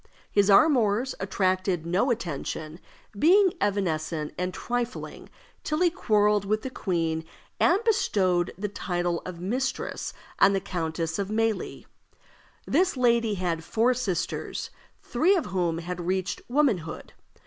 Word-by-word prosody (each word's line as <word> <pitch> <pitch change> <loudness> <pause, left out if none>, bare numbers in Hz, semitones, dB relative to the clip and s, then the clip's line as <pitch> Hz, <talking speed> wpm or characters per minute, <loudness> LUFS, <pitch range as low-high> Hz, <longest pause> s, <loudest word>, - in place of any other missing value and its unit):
His 205 0 +3
amours 240 0 +4
attracted 185 -3 0
no 180 +10 +1
attention, 165 - -3 0.4
being 375 - +5
evanescent 165 -6 -1
and 180 +1 -2
trifling, 245 +5 -4 0.3
till 305 +1 -1
he 355 -1 +4
quarreled 210 - +2
with 215 +2 -1
the 260 - -4
queen, 165 -7 -1 0.4
and 360 +3 +4
bestowed 185 - +2
the 210 +2 -2
title 175 -3 -2
of 180 -2 -7
mistress 250 +9 -2 0.3
on 195 - +6
the 195 - +2
Countess 165 -3 -3
of 200 -1 -2
Mailly. 225 0 -1 0.8
This 370 -6 +2
lady 235 -3 +3
had 170 -3 -2
four 230 +8 +2
sisters, 190 -9 -3 0.3
three 330 +11 +3
of 345 - 0
whom 175 -3 0
had 175 +1 -5
reached 185 +1 -2
womanhood. 240 - 0
195 Hz, 125 wpm, -26 LUFS, 175-240 Hz, 0.8 s, on